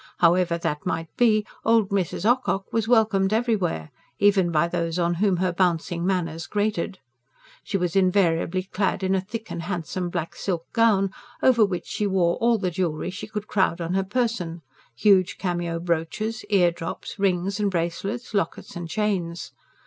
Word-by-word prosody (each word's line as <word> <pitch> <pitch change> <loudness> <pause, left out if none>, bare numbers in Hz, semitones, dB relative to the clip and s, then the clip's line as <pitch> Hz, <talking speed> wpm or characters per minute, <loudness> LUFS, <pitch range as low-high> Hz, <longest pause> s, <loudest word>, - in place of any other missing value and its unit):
However 170 0 +3
that 150 -3 -3
might 165 -3 -3
be, 215 -3 +3 0.2
"old 225 -3 +3
Mrs. 195 -2 -1
Ocock" 240 -4 +2
was 225 -1 +1
welcomed 215 -5 +3
everywhere 215 - 0 0.3
even 200 -3 +4
by 165 0 +2
those 170 -1 -2
on 175 -1 +1
whom 200 -4 +3
her 180 0 0
bouncing 175 -1 0
manners 165 -4 -1
grated. 205 -3 -1 0.7
She 200 - -1
was 180 -1 -2
invariably 185 -2 +2
clad 190 0 -1
in 190 0 +1
a 190 - +2
thick 220 +3 -7
and 170 - -4
handsome 175 0 -3
black 170 -2 -4
silk 170 -4 -3
gown, 210 -5 +3 0.3
over 240 -4 +5
which 190 -4 -1
she 210 - -2
wore 180 -3 +2
all 235 0 +3
the 185 -3 -1
jewellery 175 -1 -2
she 200 - -7
could 210 -1 -5
crowd 190 -4 +1
on 170 +1 -2
her 195 0 +2
person 195 -6 -2 0.3
huge 185 - +3
cameo 175 -2 -2
brooches, 175 +7 -2
ear 180 -4 +4
drops, 165 +4 -7
rings 195 +1 0
and 205 -1 +2
bracelets, 195 +8 -3
lockets 195 -5 -2
and 175 -1 -6
chains. 185 -5 -2
185 Hz, 165 wpm, -24 LUFS, 170-210 Hz, 0.7 s, over